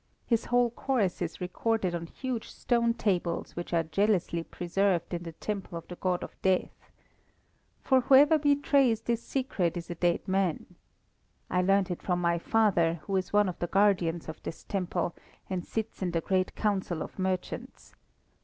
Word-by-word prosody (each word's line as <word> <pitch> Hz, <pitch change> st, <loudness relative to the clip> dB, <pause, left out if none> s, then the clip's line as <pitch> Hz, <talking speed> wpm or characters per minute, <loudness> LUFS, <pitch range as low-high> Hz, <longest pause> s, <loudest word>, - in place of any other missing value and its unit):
His 230 Hz, -2 st, +1 dB
whole 245 Hz, -1 st, +3 dB
course 235 Hz, -8 st, 0 dB
is 170 Hz, -2 st, -3 dB
recorded 185 Hz, +1 st, -1 dB
on 170 Hz, -1 st, -4 dB
huge 250 Hz, +3 st, -4 dB
stone 235 Hz, -1 st, +1 dB
tables 180 Hz, -6 st, -1 dB
which 175 Hz, -, -5 dB
are 170 Hz, -1 st, +2 dB
jealously 180 Hz, 0 st, +1 dB
preserved 180 Hz, +1 st, 0 dB
in 175 Hz, -, -2 dB
the 165 Hz, -1 st, -7 dB
temple 195 Hz, -1 st, -4 dB
of 165 Hz, -, -9 dB
the 175 Hz, -, -7 dB
God 180 Hz, 0 st, -1 dB
of -, -, -8 dB
Death. 190 Hz, -1 st, 0 dB, 0.9 s
For 260 Hz, -2 st, +4 dB
whoever 285 Hz, +4 st, +6 dB
betrays 280 Hz, -5 st, +3 dB
this 235 Hz, -1 st, -1 dB
secret 205 Hz, -, -1 dB
is 170 Hz, 0 st, -6 dB
a -, -, -1 dB
dead 175 Hz, 0 st, 0 dB
man. 190 Hz, -3 st, 0 dB, 0.8 s
I 180 Hz, -, +3 dB
learnt 195 Hz, 0 st, +2 dB
it 175 Hz, -, -4 dB
from 180 Hz, -2 st, 0 dB
my 170 Hz, -1 st, +1 dB
father, 175 Hz, -5 st, +2 dB
who 195 Hz, +5 st, -2 dB
is 185 Hz, -1 st, -1 dB
one 205 Hz, -1 st, +4 dB
of 180 Hz, -, -5 dB
the 175 Hz, -, -1 dB
guardians 180 Hz, -4 st, +2 dB
of 160 Hz, -, -7 dB
this -, -, -7 dB
temple, 180 Hz, -3 st, -2 dB, 0.4 s
and 180 Hz, -2 st, -1 dB
sits 220 Hz, +2 st, -4 dB
in 185 Hz, -, 0 dB
the 165 Hz, -1 st, -1 dB
great 185 Hz, +2 st, 0 dB
council 190 Hz, -6 st, -1 dB
of -, -, -11 dB
merchants. 185 Hz, -1 st, -4 dB
190 Hz, 170 wpm, -29 LUFS, 175-225 Hz, 0.9 s, whoever